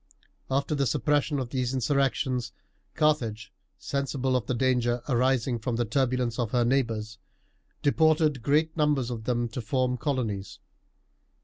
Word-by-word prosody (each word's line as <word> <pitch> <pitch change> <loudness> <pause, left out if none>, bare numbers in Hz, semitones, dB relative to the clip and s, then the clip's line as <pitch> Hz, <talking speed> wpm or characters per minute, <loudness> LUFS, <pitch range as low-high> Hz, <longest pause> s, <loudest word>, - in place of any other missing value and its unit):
After 140 +3 0
the 140 -2 +1
suppression 145 +6 +1
of 130 -2 -4
these 130 -1 -1
insurrections, 130 -2 0 0.4
Carthage, 115 -10 0 0.2
sensible 135 -2 -1
of 125 - -1
the 130 - 0
danger 120 -1 +1
arising 125 -1 +1
from 115 +1 -2
the 120 +1 0
turbulence 125 0 0
of 120 -3 0
her 120 0 +2
neighbours, 115 -4 -1 0.6
deported 155 -2 +3
great 155 +5 +1
numbers 145 -6 +1
of 110 -2 -5
them 120 0 0
to 120 +2 -5
form 125 +2 0
colonies. 115 -9 -2
130 Hz, 135 wpm, -27 LUFS, 120-140 Hz, 0.6 s, deported